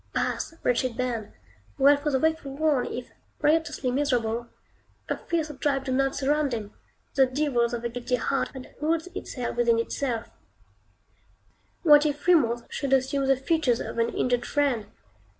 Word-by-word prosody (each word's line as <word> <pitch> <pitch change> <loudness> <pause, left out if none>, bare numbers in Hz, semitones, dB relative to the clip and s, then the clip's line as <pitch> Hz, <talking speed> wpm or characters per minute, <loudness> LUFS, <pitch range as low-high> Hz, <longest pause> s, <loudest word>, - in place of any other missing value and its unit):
Pass, - - -1
wretched 245 -1 +1
band! 240 -4 -2 0.5
Well 285 +1 +6
for 285 +1 -2
the 270 - +2
wakeful 315 -3 -1
one, 305 -4 +2
if, 245 - -6 0.3
riotously 310 -4 +1
miserable, 240 -4 0 0.6
a - - -1
fiercer 320 -3 -2
tribe 275 -1 0
do 260 - -2
not 270 +1 +1
surround 290 0 +1
him, 210 -2 -6 0.4
the 265 -2 +4
devils 255 -3 +1
of 240 -1 -4
a - - 0
guilty 245 +1 -2
heart, 270 +3 -1
that 260 - -10
holds 320 +3 0
its - - -7
hell 250 -3 -3
within 235 -1 +3
itself. 230 0 -2 1.5
What 295 -2 +7
if 295 0 -4
Remorse 245 -10 +3
should 275 -2 -2
assume 270 +1 +2
the 270 -1 +4
features 270 -4 +1
of - - -5
an 230 0 +2
injured 245 0 0
friend? 270 -8 0
270 Hz, 160 wpm, -26 LUFS, 240-295 Hz, 1.5 s, What